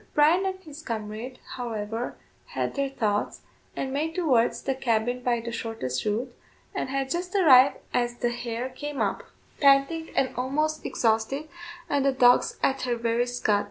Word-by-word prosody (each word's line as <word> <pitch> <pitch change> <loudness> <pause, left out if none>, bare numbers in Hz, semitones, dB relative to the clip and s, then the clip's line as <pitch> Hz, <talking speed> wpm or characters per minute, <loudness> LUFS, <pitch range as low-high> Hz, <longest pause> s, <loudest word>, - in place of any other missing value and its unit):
Bryan 330 +6 +4
and 375 0 -3
his 305 -2 -10
comrade, 225 0 -5 0.2
however, 225 -1 -4 0.3
had - - -2
their 280 -1 -1
thoughts, 210 -6 -1 0.3
and 265 0 -3
made 315 +3 -1
towards 265 -10 +2
the 270 - 0
cabin 245 -1 0
by 240 -1 0
the 235 +1 -5
shortest 225 - -3
route, 235 +4 -2 0.4
and - - -3
had 270 0 -2
just 360 +2 -3
arrived 275 -8 +7 0.2
as 240 -1 0
the 240 0 -1
hare 240 +1 -4
came 290 +2 -6
up, - - 0 0.4
panting 280 +4 +4
and 265 - +1
almost 305 +5 -1
exhausted, 230 +6 0 0.4
and 285 -1 +1
the 275 - +3
dogs 245 -1 +4
at 270 0 +2
her 245 -1 0
very 235 +1 0
scut. 245 -4 +1
255 Hz, 160 wpm, -26 LUFS, 235-280 Hz, 0.4 s, arrived